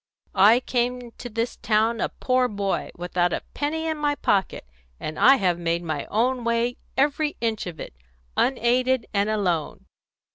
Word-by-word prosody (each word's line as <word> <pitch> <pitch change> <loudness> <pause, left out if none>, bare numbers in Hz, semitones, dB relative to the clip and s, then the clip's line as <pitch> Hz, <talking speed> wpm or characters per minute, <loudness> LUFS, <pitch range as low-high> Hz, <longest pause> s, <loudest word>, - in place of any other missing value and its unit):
"I 215 +6 +6
came 245 0 -1
into 245 0 -9
this 230 +2 -3
town 220 +1 +1
a - - 0
poor 255 0 +1
boy, 200 -3 -2
without 175 0 0
a - - -3
penny 320 +2 -2
in 315 -1 -1
my 290 -1 +1
pocket, 195 - 0 0.3
and 155 - -5
I 270 +2 +7
have 180 -8 +1
made 170 0 -1
my 155 -4 -3
own 245 +3 0
way, 235 +1 0 0.2
every 295 +2 +1
inch 225 -4 -1
of 165 -3 -7
it, - - -7 0.4
unaided 255 0 +2
and 200 +1 +1
alone. 180 -8 -1
230 Hz, 160 wpm, -24 LUFS, 190-255 Hz, 0.4 s, I